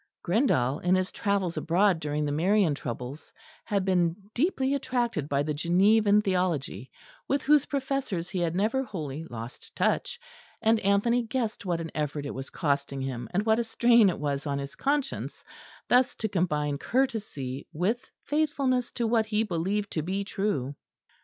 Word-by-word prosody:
Grindal, 160 - +2
in 180 +1 +2
his 185 0 0
travels 195 -4 -1
abroad 180 +1 +2
during 150 -1 -1
the 145 - -1
Marian 180 +2 +3
troubles, 125 +2 -6 0.3
had 200 -3 0
been 175 -3 +2 0.2
deeply 270 -2 +1
attracted 240 - -1
by 140 0 +1
the 150 +1 -2
Genevan 200 +6 +4
theology, 170 - -1 0.4
with 280 0 0
whose 295 0 +4
professors 265 -10 -2
he 185 +1 -3
had 170 -1 0
never 220 +7 +1
wholly 160 - -5
lost 120 -2 -9
touch; 485 - 0 0.4
and 225 0 +3
Anthony 205 +5 +2
guessed 230 -4 -3
what 170 -2 0
an 165 -1 -5
effort 150 -1 -2
it 140 - -4
was 135 +1 -6
costing 140 -3 -1
him, 125 -3 -4
and 200 +4 0
what 220 0 +3
a - - +2
strain 235 -2 +5
it 175 - -2
was 145 0 -2
on 140 -1 -1
his 140 0 -5
conscience, 280 -1 -2 0.4
thus 250 +1 +3
to 220 - -2
combine 150 -7 0
courtesy 205 - -2
with 220 +11 -1
faithfulness 280 -5 0
to 235 - -1
what 225 -1 +2
he 215 0 +1
believed 200 +2 -1
to 155 - -1
be 190 +5 -2
true. 195 - -2
190 Hz, 165 wpm, -28 LUFS, 150-230 Hz, 0.4 s, strain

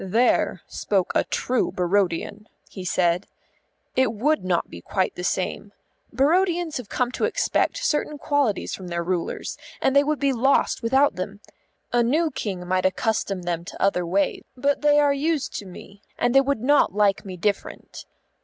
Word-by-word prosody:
"There 225 +6 +1
spoke 195 -3 -1
a - - +3
true 250 -1 0
Barodian," 195 +3 -1 0.2
he 190 - -9
said. 175 0 +1 0.7
"It 260 -3 +3
would 280 +7 0
not 180 -2 0
be 85 - -10 0.3
the 180 - -7
same. 190 +2 -2 0.4
Barodians 340 +5 +2
have 250 -5 -8
come 250 -1 0
to - - -1
expect - - 0
certain 300 -4 0
qualities 285 -8 0
from 185 - -6
their 170 -1 -2
rulers, 175 -1 -3 0.2
and 265 - +1
they 280 - +6
would 300 +1 0
be 275 -1 +1
lost 265 +3 +2
without 265 -2 +3
them. 195 +2 -5 0.5
A 240 - +4
new 305 +7 +2
King 185 -8 -4
might 185 0 +2
accustom 195 -2 -1
them 170 -1 -2
to - - -10
other 195 -2 +2
ways, 190 +3 0 0.2
but 280 +3 +1
they 295 0 +5
are 290 -1 +4
used 295 0 -1
to 200 - -10
me, 195 +2 -12 0.2
and 245 0 +1
they 270 - +7
would 275 -4 -1
not 285 -5 +3
like 205 -2 +2
me 185 -2 -8
different. 200 +3 -3
215 Hz, 170 wpm, -24 LUFS, 185-280 Hz, 0.7 s, they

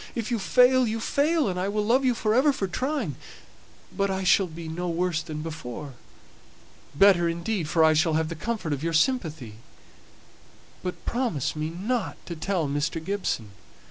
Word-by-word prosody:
If 230 -1 -3
you 235 - +1
fail, 250 +4 +4
you 225 +1 -2
fail, 295 +5 +1
and 180 -2 -2
I 185 - -1
will 210 0 -1
love 250 +5 +3
you 250 -2 +2
for 215 -1 0
ever 270 +5 +4
for 205 - -2
trying; 255 - -2 0.8
but 200 0 +1
I 190 0 -2
shall 185 +1 +4
be 165 0 -8
no 175 +3 -3
worse 170 -1 0
off - - -14
than 150 -1 -5
before. 150 -3 -7 1.0
Better, 175 -1 +5
indeed; 170 0 -2
for 165 0 +3
I 160 0 +6
shall 155 +1 +2
have 160 0 0
the - - -3
comfort 185 -2 -3
of 140 - -4
your 165 0 -1
sympathy. 160 - 0 1.2
But 180 -1 -6
promise 235 - -1
me 155 +1 -2
not 205 +6 -2
to 170 - -6
tell 165 0 -1
Mr. 145 +4 -1
Gibson." 185 - -2
180 Hz, 180 wpm, -26 LUFS, 160-225 Hz, 1.2 s, I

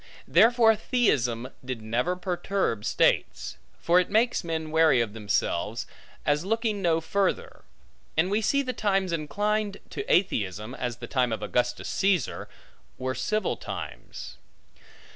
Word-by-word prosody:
Therefore 230 -1 +6
atheism 130 - +1
did 130 -2 -4
never 120 +11 0
perturb 180 - -1
states; - - +1 0.2
for 175 +2 +4
it 180 - 0
makes 225 +2 +2
men 160 -2 -3
wary 160 -5 +5
of 115 -3 -1
themselves, 105 0 -1 0.4
as 145 +1 +2
looking 220 0 -1
no 165 -3 +3
further: 195 +4 -1 0.5
and 175 +4 +2
we 210 +2 +2
see 280 +6 +2
the 255 -1 -3
times 195 -4 0
inclined 205 +6 -1
to 410 - -4
atheism 110 - +1
(as 125 -3 -4
the 120 - -7
time 125 -2 +1
of 110 -1 -3
Augustus 125 0 -1
Caesar) 195 -3 0 0.5
were 130 0 -2
civil 215 +9 -1
times. - - -7
170 Hz, 135 wpm, -27 LUFS, 125-205 Hz, 0.5 s, Therefore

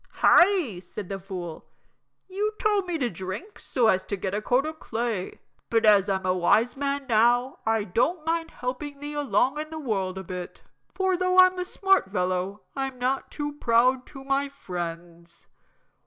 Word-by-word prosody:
"Hi!" 345 - +4
said 185 +1 -8
the 195 -1 -4
fool. 180 -4 -7 0.6
"You 410 +3 -2
told 415 -4 +1
me 350 -2 -1
to 260 -5 0
drink 190 - -7
so 250 -3 0
as 190 -3 +3
to 200 - -3
get 190 0 -3
a 210 - -1
coat 250 +6 +2
o' 315 - -3
clay; 230 -9 -3 0.3
but 225 -1 +2
as 205 -2 +5
I'm 190 -1 -1
a 185 - +2
wise 220 +7 +2
man 280 0 -2
now 240 +3 +3
I 225 -1 +2
don't 305 - 0
mind 330 0 -1
helping 280 +3 -5
thee 290 +1 -6
along 290 -1 +1
in 310 0 -5
the 320 - -7
world 195 -10 -2
a 190 - -5
bit, 180 -1 -7 0.3
for 380 0 +1
though 365 +1 +1
I'm 370 0 +7
a 360 - -2
smart 385 - +2
fellow 185 +1 -1
I'm 270 -1 -3
not 255 +2 -1
too 295 -1 -4
proud 250 +2 +3
to 270 -2 -11
my 275 +1 0
friends." 170 -6 -7
245 Hz, 180 wpm, -26 LUFS, 190-300 Hz, 0.6 s, I'm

